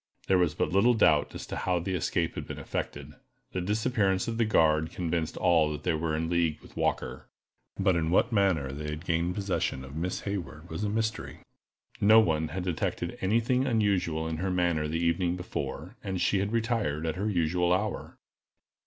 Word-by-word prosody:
There 95 Hz, -1 st, +3 dB
was 85 Hz, -4 st, +2 dB
but -, -, 0 dB
little 115 Hz, +5 st, +5 dB
doubt 80 Hz, -9 st, +3 dB
as -, -, -6 dB
to -, -, -6 dB
how 90 Hz, -1 st, 0 dB
the 90 Hz, +3 st, -2 dB
escape 85 Hz, -6 st, 0 dB
had -, -, -6 dB
been -, -, -6 dB
effected. 70 Hz, +1 st, -5 dB, 0.4 s
The 95 Hz, -, -2 dB
disappearance 105 Hz, -1 st, +1 dB
of 115 Hz, 0 st, -3 dB
the 115 Hz, -, +4 dB
guard 80 Hz, -6 st, +3 dB
convinced 85 Hz, -2 st, -2 dB
all 80 Hz, -3 st, +3 dB
that 75 Hz, 0 st, -6 dB
they 90 Hz, -, +1 dB
were 80 Hz, 0 st, -1 dB
in 80 Hz, +1 st, -1 dB
league 85 Hz, -3 st, +1 dB
with -, -, -17 dB
Walker, -, -, -2 dB, 0.5 s
but 95 Hz, -2 st, +2 dB
in 80 Hz, -1 st, 0 dB
what 95 Hz, +7 st, +3 dB
manner 95 Hz, -, +2 dB
they 75 Hz, +2 st, -6 dB
had 75 Hz, +3 st, -6 dB
gained 85 Hz, +1 st, 0 dB
possession 95 Hz, -9 st, -2 dB
of 70 Hz, +2 st, -10 dB
Miss 90 Hz, +3 st, -2 dB
Hayward 85 Hz, -5 st, -5 dB
was 80 Hz, +6 st, -3 dB
a 105 Hz, -, 0 dB
mystery. 110 Hz, +1 st, -2 dB, 0.6 s
No 110 Hz, +2 st, +7 dB
one 80 Hz, -7 st, +2 dB
had 90 Hz, +3 st, -4 dB
detected 90 Hz, -3 st, -2 dB
any 105 Hz, +5 st, +3 dB
thing 125 Hz, +3 st, +1 dB
unusual 95 Hz, -9 st, +1 dB
in 80 Hz, -1 st, -3 dB
her 95 Hz, +3 st, -1 dB
manner 85 Hz, -4 st, +1 dB
the 80 Hz, +2 st, -2 dB
evening 85 Hz, +1 st, +1 dB
before, 90 Hz, -, -5 dB
and 95 Hz, -2 st, -3 dB
she 95 Hz, -, +2 dB
had 100 Hz, +2 st, -1 dB
retired 110 Hz, -10 st, 0 dB
at 80 Hz, -, -1 dB
her 100 Hz, +4 st, -1 dB
usual 90 Hz, -1 st, +1 dB
hour. 100 Hz, +3 st, -1 dB
90 Hz, 195 wpm, -28 LUFS, 80-100 Hz, 0.6 s, No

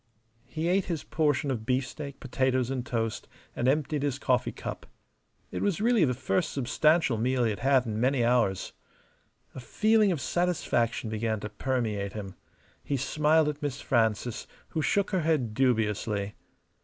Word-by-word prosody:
He 155 Hz, +6 st, -3 dB
ate 190 Hz, +2 st, +2 dB
his 165 Hz, -5 st, -3 dB
portion 150 Hz, -3 st, 0 dB
of 115 Hz, -4 st, -3 dB
beefsteak, 135 Hz, +3 st, -3 dB
potatoes, 130 Hz, -1 st, 0 dB
and 130 Hz, -2 st, -2 dB
toast, 115 Hz, -3 st, -3 dB, 0.3 s
and 120 Hz, -, 0 dB
emptied 150 Hz, +1 st, +1 dB
his 140 Hz, -2 st, -1 dB
coffee 130 Hz, -3 st, +1 dB
cup. -, -, -7 dB, 0.6 s
It -, -, -4 dB
was 200 Hz, -5 st, 0 dB
really 225 Hz, -5 st, +4 dB
the 125 Hz, -2 st, 0 dB
first 145 Hz, +6 st, 0 dB
substantial 140 Hz, -1 st, +2 dB
meal 125 Hz, +2 st, +1 dB
he 115 Hz, -, +2 dB
had 105 Hz, -, -5 dB
had 135 Hz, -2 st, +3 dB
in 110 Hz, -2 st, -3 dB
many 130 Hz, -1 st, +2 dB
hours. 120 Hz, -6 st, +1 dB, 0.8 s
A -, -, -7 dB
feeling 215 Hz, -, +3 dB
of 165 Hz, -, -1 dB
satisfaction 125 Hz, -10 st, 0 dB
began 110 Hz, 0 st, -1 dB
to 105 Hz, -, -5 dB
permeate 105 Hz, -4 st, -2 dB
him. 100 Hz, -3 st, -6 dB, 0.5 s
He 140 Hz, -, -1 dB
smiled 150 Hz, +4 st, +2 dB
at 150 Hz, 0 st, -3 dB
Miss 140 Hz, -2 st, -3 dB
Frances, 115 Hz, 0 st, 0 dB, 0.2 s
who 160 Hz, -, -2 dB
shook 200 Hz, +6 st, +1 dB
her 185 Hz, -3 st, +1 dB
head 150 Hz, -9 st, 0 dB
dubiously. 105 Hz, -4 st, 0 dB
130 Hz, 160 wpm, -28 LUFS, 115-155 Hz, 0.8 s, really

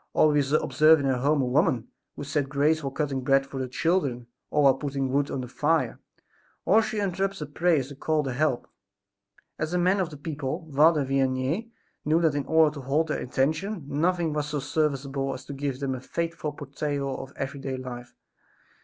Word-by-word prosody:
Or, 155 Hz, -, +5 dB
we 150 Hz, 0 st, +3 dB, 0.2 s
observe 155 Hz, 0 st, +5 dB
in 140 Hz, -, -2 dB
her 130 Hz, -2 st, +1 dB
home 145 Hz, +1 st, +2 dB
a -, -, 0 dB
woman, 125 Hz, -2 st, +1 dB, 0.3 s
who -, -, -6 dB
said 140 Hz, -1 st, -1 dB
grace 150 Hz, +3 st, +2 dB
while 140 Hz, -, -2 dB
cutting 135 Hz, -1 st, -2 dB
bread 135 Hz, +1 st, +3 dB
for 135 Hz, -1 st, -7 dB
the 130 Hz, -, -2 dB
children 135 Hz, -3 st, 0 dB, 0.2 s
or 150 Hz, -, +2 dB
while 135 Hz, -1 st, +7 dB
putting 135 Hz, -1 st, -3 dB
wood 140 Hz, +1 st, +1 dB
on 135 Hz, -, -3 dB
the 125 Hz, -, -6 dB
fire, 145 Hz, 0 st, 0 dB, 0.7 s
or 220 Hz, +3 st, +5 dB
she 220 Hz, -1 st, -3 dB
interrupts 195 Hz, 0 st, -1 dB
her 150 Hz, -, -4 dB
prayers 150 Hz, -2 st, +1 dB
to 140 Hz, -, -9 dB
call 155 Hz, +2 st, 0 dB
the 135 Hz, -3 st, -3 dB
help." 135 Hz, -1 st, 0 dB, 0.9 s
As 155 Hz, +3 st, -2 dB
a -, -, +3 dB
man 185 Hz, +3 st, +3 dB
of 180 Hz, -4 st, 0 dB
the 150 Hz, -, -10 dB
people, 150 Hz, +2 st, -4 dB
Father 150 Hz, 0 st, +5 dB
Vianney 135 Hz, -, 0 dB, 0.3 s
knew 155 Hz, +2 st, +3 dB
that 160 Hz, -3 st, +2 dB
in 145 Hz, -2 st, -2 dB
order 160 Hz, -2 st, +4 dB
to 145 Hz, -, -7 dB
hold 150 Hz, +5 st, 0 dB
their -, -, -1 dB
attention 155 Hz, -, -1 dB
nothing 165 Hz, +2 st, 0 dB
was 150 Hz, -1 st, -1 dB
so 150 Hz, 0 st, -2 dB
serviceable 135 Hz, -2 st, -1 dB
as 130 Hz, +1 st, -10 dB
to 140 Hz, -, -7 dB
give 135 Hz, -1 st, -3 dB
them 135 Hz, -2 st, -1 dB
a 130 Hz, -, -5 dB
faithful 165 Hz, +1 st, -3 dB
portrayal 140 Hz, -1 st, -3 dB
of 135 Hz, -, -10 dB
every 140 Hz, +1 st, -4 dB
day 135 Hz, -1 st, -4 dB
life. 125 Hz, -1 st, -8 dB
145 Hz, 205 wpm, -26 LUFS, 135-160 Hz, 0.9 s, while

